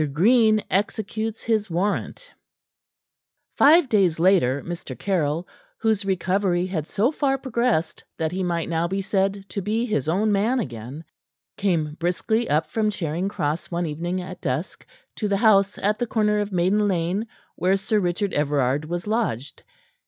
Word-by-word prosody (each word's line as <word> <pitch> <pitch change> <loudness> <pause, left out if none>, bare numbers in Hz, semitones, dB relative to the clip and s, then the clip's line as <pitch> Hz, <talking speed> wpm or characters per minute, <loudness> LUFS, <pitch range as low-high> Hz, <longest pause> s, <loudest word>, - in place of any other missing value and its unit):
GREEN 215 - +4
EXECUTES 215 +2 -2
HIS 220 -3 0
WARRANT 200 - -2 1.2
Five 315 +1 +6
days 195 -8 +2
later, 165 -7 +3
Mr. 175 0 -6
Caryll 170 -3 -1 0.3
whose 220 -3 +1
recovery 185 -1 +1
had 165 -5 -3
so 230 +7 +1
far 275 -3 0
progressed 235 -10 -1
that 160 -1 -1
he 185 +1 -3
might 170 -2 -1
now 165 0 0
be 195 +3 -2
said 195 0 -1
to 200 - -3
be 220 +5 -1
his 155 - -1
own 205 +6 +2
man 220 +6 +2
again 125 - -6 0.5
came 165 -6 0
briskly 200 +7 0
up 155 +2 +2
from 215 +7 0
Charing 175 -2 -2
Cross 155 -4 -2
one 175 0 -1
evening 170 +4 -3
at 185 0 -9
dusk, 145 +5 -4 0.3
to 210 - -1
the 200 -1 +1
house 200 -2 +4
at 210 +2 0
the 240 - -1
corner 210 -2 +1
of 205 0 -2
Maiden 190 +4 +2
Lane 185 +4 -1 0.3
where 185 +3 +2
Sir 210 +2 0
Richard 185 +2 -1
Everard 145 -1 +1
was 175 +2 -4
lodged. 210 - -2
190 Hz, 155 wpm, -23 LUFS, 165-215 Hz, 1.2 s, Five